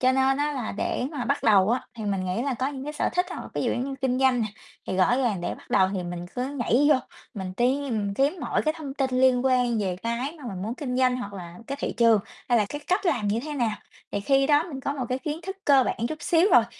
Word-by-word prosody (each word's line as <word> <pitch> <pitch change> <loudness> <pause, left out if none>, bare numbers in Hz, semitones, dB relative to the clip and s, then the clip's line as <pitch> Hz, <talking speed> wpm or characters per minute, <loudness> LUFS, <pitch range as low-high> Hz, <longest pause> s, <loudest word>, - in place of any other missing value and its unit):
cho 255 0 +4
nên 265 0 +3
á 295 0 0
là 250 -5 -3
để 210 - -2
mà 265 -6 -4
bắt - - 0
đầu 205 -2 +5
á 250 - +2
thì 220 - -6
mình 195 -2 -1
nghĩ 185 +5 -1
là 270 -1 -1
có 255 +3 -1
những 275 -2 -6
cái 300 - -4
sở - - 0
thích 360 0 +2
hoặc - - -5
là - - -9
ví - - -1
dụ - - +1
giống 245 - -1
như 275 0 -4
kinh 255 -1 +1
doanh 260 -2 +3
nè, 220 - +1 0.4
thì 185 - -2
rõ 190 +6 +4
ràng 235 -8 0
để 175 - -2
bắt - - -18
đầu 190 0 +4
thì 185 - -2
mình 175 0 -5
cứ 250 +1 -1
nhảy 275 0 +2
vô 290 - +7 0.4
mình 190 -3 -5
tìm 240 -5 0
kiếm 280 - +2
mọi 245 - 0
cái 310 0 0
thông 285 -4 -6
tin 270 -2 0
liên 260 -1 +4
quan 250 -3 +2
về 185 -3 -1
cái 245 +7 -2
mà 290 - -11
mình 190 -4 -5
muốn 220 +4 -3
kinh 250 -2 -3
doanh, 255 -1 +3
hoặc 205 -5 -6
là 175 -2 -9
cái 275 - -4
thị - - -2
trường 230 -2 +5 0.3
hay 240 -2 +4
là 210 - +2
cái 290 - -5
cách 370 +2 +1
làm 245 -11 +1
như 215 +3 +1
thế 305 - -5
nào. 235 -6 0 0.4
Thì 200 - -1
khi 270 +6 +3
đó 295 0 +4
mình 270 -4 -6
có 275 - -2
một 260 -4 -3
cái 255 +1 -1
kiến 300 +2 -4
thức 385 +2 -5
cơ 275 -2 +6
bản - - -2
chút 310 - -6
xíu 340 +3 +4
rồi - - +7
255 Hz, 290 wpm, -26 LUFS, 215-280 Hz, 0.4 s, vô